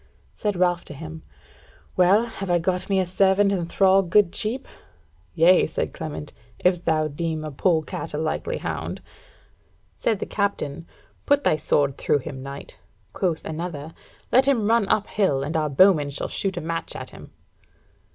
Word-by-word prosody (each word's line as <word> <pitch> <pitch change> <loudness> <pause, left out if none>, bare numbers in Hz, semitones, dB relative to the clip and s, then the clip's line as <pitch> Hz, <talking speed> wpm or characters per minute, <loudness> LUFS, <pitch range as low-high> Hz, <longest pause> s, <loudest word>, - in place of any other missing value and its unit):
Said 205 -2 -2
Ralph 175 -1 +1
to 145 - -9
him: 160 +2 -8 0.7
"Well, 190 +5 +4
have 195 -5 -6
I 175 - +4
got 180 +3 -1
me 195 -1 +2
a 185 - +1
servant 190 +2 +3
and 175 -4 -2
thrall 195 +1 +4
good 190 0 +3
cheap?" 235 +5 -2 0.7
"Yea," 175 +3 +5
said - - -3
Clement, 155 -3 -6 0.2
"if 180 -1 +1
thou 155 -2 +1
deem 155 +1 -3
a 155 - -5
polecat 160 +2 -1
a - - -2
likely 155 0 -2
hound." - - -4 1.0
Said 225 - 0
the - - -4
Captain: 170 -6 -2 0.4
"Put 285 0 +3
thy - - +3
sword 145 -2 +1
through - - +2
him, 135 -5 -6
knight." 140 +1 -9 0.3
Quoth 175 -5 -1
another: 160 -1 -5 0.4
"Let 260 +2 +5
him 245 -7 +2
run 230 -2 +3
up 210 - +2
hill, 165 -13 0
and 150 +3 -4
our 155 -1 +1
bowmen 150 0 +4
shall 140 - -3
shoot 195 -2 -3
a - - -2
match 165 +1 -4
at - - -7
him." - - -12
175 Hz, 170 wpm, -24 LUFS, 155-195 Hz, 1.0 s, Yea